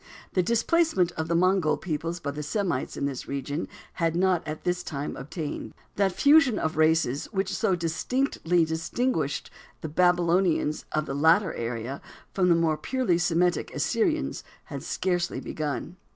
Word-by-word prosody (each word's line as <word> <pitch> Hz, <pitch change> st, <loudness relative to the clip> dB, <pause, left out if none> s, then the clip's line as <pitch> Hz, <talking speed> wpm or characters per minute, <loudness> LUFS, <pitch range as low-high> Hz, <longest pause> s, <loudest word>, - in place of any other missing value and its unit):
The 185 Hz, -, +3 dB
displacement 235 Hz, -, +2 dB
of 160 Hz, -2 st, -4 dB
the 170 Hz, -, 0 dB
Mongol 185 Hz, -2 st, +3 dB
peoples 165 Hz, 0 st, -3 dB
by 140 Hz, -, -3 dB
the 150 Hz, +1 st, -5 dB
Semites 175 Hz, -3 st, -2 dB
in -, -, -1 dB
this 135 Hz, -3 st, -4 dB
region 140 Hz, +3 st, -3 dB, 0.3 s
had 165 Hz, -1 st, 0 dB
not 180 Hz, -1 st, +2 dB
at 155 Hz, +1 st, -5 dB
this 180 Hz, 0 st, 0 dB
time 145 Hz, -1 st, -4 dB
obtained. 150 Hz, +2 st, -6 dB, 0.2 s
That 195 Hz, -1 st, +2 dB
fusion 280 Hz, -, +5 dB
of 160 Hz, -, -1 dB
races 155 Hz, -3 st, +2 dB
which 195 Hz, -2 st, -2 dB
so 210 Hz, -5 st, +1 dB
distinctly 170 Hz, -, 0 dB
distinguished 160 Hz, -, -1 dB, 0.3 s
the 160 Hz, -, -4 dB
Babylonians 175 Hz, -1 st, +2 dB
of 155 Hz, 0 st, 0 dB
the 135 Hz, -, -4 dB
later 165 Hz, +6 st, +4 dB
era 115 Hz, +3 st, -4 dB, 0.3 s
from 180 Hz, -2 st, +2 dB
the 170 Hz, -, +6 dB
more 165 Hz, -2 st, +2 dB
purely 200 Hz, 0 st, 0 dB
Semitic 175 Hz, +1 st, +1 dB
Assyrians 335 Hz, -7 st, 0 dB, 0.2 s
had -, -, -7 dB
scarcely 175 Hz, -2 st, -1 dB
begun. 150 Hz, +3 st, -4 dB
170 Hz, 150 wpm, -27 LUFS, 155-190 Hz, 0.3 s, the